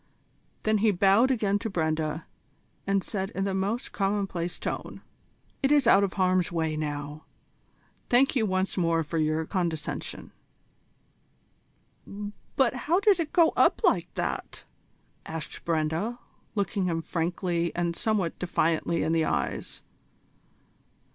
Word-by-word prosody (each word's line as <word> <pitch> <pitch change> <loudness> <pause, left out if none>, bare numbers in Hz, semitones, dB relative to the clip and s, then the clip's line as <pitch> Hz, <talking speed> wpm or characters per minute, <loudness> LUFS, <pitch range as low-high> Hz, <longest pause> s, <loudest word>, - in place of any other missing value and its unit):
Then 215 -1 +2
he 220 +1 +4
bowed 200 +6 +4
again 205 -6 +1
to 225 - -3
Brenda, 160 -3 -1 0.6
and 195 -1 +2
said 195 -1 -3
in 195 - 0
the 195 -1 -1
most 200 +5 -1
commonplace 195 -4 -1
tone: - - -5 0.6
"It 270 - +2
is 290 -3 +5
out 200 -3 +6
of 195 - -1
harm's 185 -2 +2
way 160 -2 -1
now. 150 0 -4 0.8
Thank 260 +4 +4
you 225 -4 +2
once 185 +1 -1
more 165 -1 +2
for 160 +2 -3
your 155 +1 +1
condescension." 170 -4 -3 2.2
"But 260 -3 +3
how 305 +8 +1
did 405 -3 +4
it 320 -3 -2
go 335 -3 +4
up - - +4
like - - +2
that?" - - -4 0.6
asked 160 -1 -6
Brenda, 165 +8 0 0.4
looking 200 -1 0
him 165 -2 -1
frankly 170 0 -1
and 170 -1 -1
somewhat 210 -6 -1
defiantly 170 -1 +1
in 160 - 0
the 165 -1 +2
eyes. 75 -3 -2
185 Hz, 130 wpm, -27 LUFS, 165-210 Hz, 2.2 s, out